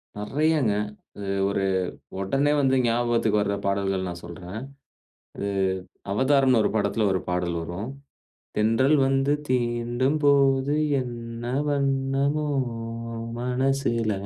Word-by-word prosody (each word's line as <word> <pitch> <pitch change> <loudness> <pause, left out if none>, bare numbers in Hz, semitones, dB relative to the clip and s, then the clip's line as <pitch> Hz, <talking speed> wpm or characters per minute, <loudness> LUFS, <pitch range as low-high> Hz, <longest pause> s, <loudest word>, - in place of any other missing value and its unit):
நெறயாங்க, 140 +2 +1 0.4
அது 100 -1 -6 0.2
ஒரு 100 0 0 0.6
உடனே 135 +10 +1
வந்து 135 -1 +3
ஞாபகத்துக்கு 115 -2 +2
வர்ற 100 0 0
பாடல்கள் 100 -1 0
நான் 85 0 -6
சொல்றேன். 90 +4 -7 0.8
அது, 100 - -3 0.6
அவதார்னு 130 +1 +4
ஒரு - - +1
படத்துல 110 0 +1
ஒரு 95 - 0
பாடல் 90 -1 -1
வரும் 85 +7 -5 0.7
தென்றல் 115 +7 +3
வந்து 135 +1 +2 0.2
தீண்டும் 120 +3 +1
போது 140 -1 +4 0.3
என்ன 120 -1 -6 0.2
வண்ணமோ 140 +1 +1 0.9
மனசுல. 125 -2 0
120 Hz, 100 wpm, -25 LUFS, 105-135 Hz, 0.9 s, அவதார்னு